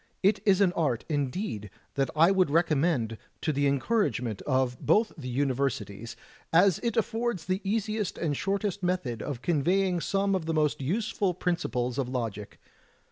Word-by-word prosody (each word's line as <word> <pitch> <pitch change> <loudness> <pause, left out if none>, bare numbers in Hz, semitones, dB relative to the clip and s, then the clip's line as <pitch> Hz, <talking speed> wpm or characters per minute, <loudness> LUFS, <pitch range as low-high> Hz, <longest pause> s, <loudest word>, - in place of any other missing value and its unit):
It 200 +3 +4
is 195 0 +5
an 185 -3 +4
art, 135 -9 0
indeed, 140 - -2 0.2
that 135 -1 0
I 165 +4 +6
would 185 -4 +3
recommend 150 -7 +1 0.2
to 155 - 0
the 145 0 +2
encouragement 135 - 0
of 130 -3 +1
both 220 +1 +3
the 130 -6 -7
Universities, 125 -5 -2 0.4
as 180 +1 +5
it 235 -2 -2
affords 225 -5 -1
the 185 +2 -1
easiest 215 0 -1
and 150 -4 -1
shortest 200 +3 -1
method 175 -11 -1
of 130 -4 -5
conveying 175 +3 +1
some 195 +1 +1
of 180 -4 -1
the 165 - 0
most 150 -2 +1
useful 195 - 0
principles 125 -8 -1
of 130 -2 -1
logic. 115 -5 -4
160 Hz, 155 wpm, -28 LUFS, 130-195 Hz, 0.4 s, I